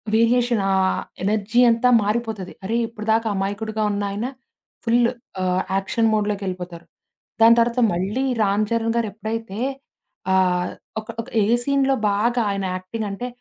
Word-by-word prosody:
Variation 235 -1 +3
ఆహ్, 190 -1 +2 0.2
energy 215 +4 +2
అంతా 230 +2 +3
మారిపోతది. 215 -3 -2
అరే! 220 +5 -1
ఇప్పటిదాకా 225 0 0
ఆ - - -4
మాయకుడిగా 215 +2 -2
ఉన్నాయన 205 +2 -2 0.6
ఫుల్లు 235 0 +3 0.3
ఆహ్, 185 0 +1 0.2
యాక్షన్ 220 +4 +1
మోడ్‌లోకెళ్ళిపోతారు. 185 -5 -3 0.6
దాని 230 +1 +7
తర్వాత 235 +2 +2
మళ్ళీ 195 +9 -1 0.2
'రామ్ 205 +1 +2
చరణ్' 230 0 0
గారు 230 -2 +1
ఎప్పుడైతే 220 -1 -5 0.7
ఆహ్, 180 -1 +2 0.3
ఒక 215 - -20
ఒక 230 - -13 0.2
ఏ - - +2 0.2
సీన్‌లో 275 0 +2 0.2
బాగా 235 +4 +1
ఆయన 195 -1 -2
యాక్టింగ్ 195 +4 -5
అంటే, 200 +5 -4
215 Hz, 135 wpm, -22 LUFS, 195-230 Hz, 0.7 s, దాని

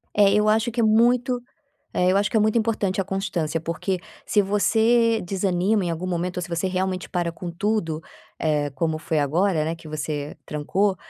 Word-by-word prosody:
É, 200 -1 +5
eu 210 +1 +3
acho 225 +2 +2
que 240 - -4
é - - +3
muito 245 +3 +3 0.5
é, 180 +1 +3
eu - - +2
acho 200 0 +2
que - - 0
é - - +5
muito 215 +2 +2
importante 215 -4 0
a - - -1
constância, 180 -5 -2
porque, 170 +3 -2 0.3
se 210 - +3
você 225 +3 +3
desanima 190 +2 +1
em 175 - -1
algum 170 +2 -3
momento 180 0 -2
ou - - -2
se - - -6
você 170 +2 -1
realmente 185 0 -2
para 175 -2 -1
com 175 +1 -6
tudo, 170 -3 -1 0.4
eh, 150 -2 0
como 160 +2 0
foi 155 0 -1
agora, 160 +3 +1
né, 160 +2 -1
que 165 -1 -12
você 150 -1 -4
trancou, 190 +7 0
185 Hz, 200 wpm, -24 LUFS, 165-210 Hz, 0.5 s, É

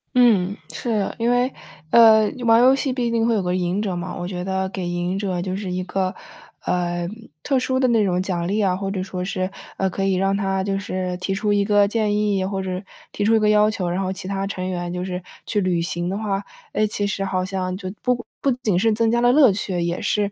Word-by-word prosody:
嗯， 210 -6 +4 0.2
是。 220 -5 -1
因 230 +1 +1
为， 245 +2 +2 0.4
呃， 220 -2 +7
玩 225 0 +6
游 260 +2 +6
戏 270 -1 -1
毕 240 -2 -1
竟 230 0 +2
会 230 - +2
有 195 - 0
个 180 0 0
赢 180 +3 0
者 195 -4 -2
嘛， 175 +1 -5
我 175 - -4
觉 180 -1 -4
得 190 0 -1
给 185 -2 -4
赢 175 +2 -2
者 185 -3 -2
就 185 0 -3
是 195 -2 -4
一 180 0 -2
个， 185 0 -2 0.5
呃， 175 -1 -1 0.4
特 270 -2 +2
殊 260 +1 0
的 255 - +3
那 225 -3 +3
种 180 -2 +1
奖 175 -3 -2
励 205 +3 0
啊， 185 -2 +2
或 195 +1 -3
者 190 -2 -2
说 185 -1 -4
是， 185 0 -2 0.3
呃， 190 - +1
可 195 +1 -3
以 195 - +2
让 195 +1 +1
他 195 -1 0
就 195 0 -1
是 185 -1 -3
提 195 +1 -2
出 210 +1 0
一 205 - +3
个 205 0 +4
建 210 -1 0
议， 205 -2 +1
或 195 0 -2
者 185 0 -3 0.3
提 205 - -2
出 225 +1 +4
一 - - +4
个 210 0 +3
要 210 0 +5
求， 185 -4 -2
然 180 +2 -1
后 190 -1 -1
其 190 -1 -6
他 195 0 -2
成 185 -2 -4
员 175 -1 -3
就 180 0 -3
是 180 -1 -4 0.2
去 205 -2 0
履 180 -2 +1
行 175 +2 -2
的 195 - -2
话， 200 -2 -2 0.3
诶， 215 - +2
其 205 -1 -2
实 200 -1 -2
好 185 -1 -1
像 185 -1 -3
就 185 -1 -6
不 245 -2 0 0.2
不 275 - +2
仅 190 -6 +2
是 225 +2 +3
增 225 +1 +2
加 235 - +2
了 245 0 +5
乐 275 -4 +6
趣， 190 -2 -2
也 170 +1 -2
是 205 -1 0
195 Hz, 265 characters per minute, -22 LUFS, 185-215 Hz, 0.5 s, 呃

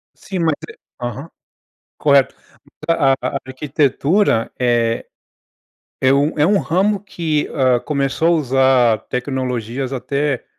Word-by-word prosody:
Sim, 190 -2 -6
mas 165 -2 +2 0.2
é - - -10 0.3
Aham, 125 +6 -5 0.7
correto. 140 -2 +3 0.5
A 145 -5 +3
a - - -2
arquitetura 140 - +1
é 120 -2 +1 1.0
é 130 0 +4
um 145 +3 +1
é 150 - +4
um 200 +2 +3
ramo 195 +4 +1
que, 165 -6 -2
hã, 130 -4 +2
começou 140 +3 0
a - - +5
usar 130 -6 +3
tecnologias 125 -1 -3
até 140 +1 -2
140 Hz, 120 wpm, -18 LUFS, 125-155 Hz, 1.0 s, a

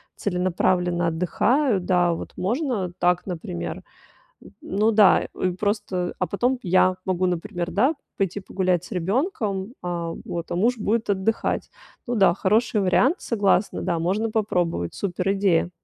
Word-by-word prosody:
целенаправленно 180 -2 0
отдыхаю, 205 - +1
да, 180 -1 +2
вот - - -8
можно 225 - -1
так, 180 +1 +1
например. 85 - -5 0.6
Н - - -14
ну 210 +3 +1
да, 210 -2 +5 0.3
просто 205 -4 -1
а 185 - 0
потом 245 +7 0
я 185 0 +3
могу, 185 -1 +1
например, 175 0 -3
да, 260 - +2 0.2
пойти 195 0 -1
погулять 185 -3 0
с - - -14
ребенком, 200 - -1
а 170 -2 -3
вот, 170 -1 -5
а - - -2
муж 230 +5 +1
будет 215 0 0
отдыхать. 200 +3 -1 0.4
Ну 245 - -1
да, 195 -5 +5
хороший 210 +3 +1
вариант, 220 - +3
согласна, 205 -3 +1
да, 170 -3 0
можно 205 +6 0
попробовать. 175 - -1
Супер 190 0 -1
идея. 195 -4 +2
190 Hz, 140 wpm, -24 LUFS, 175-215 Hz, 0.6 s, да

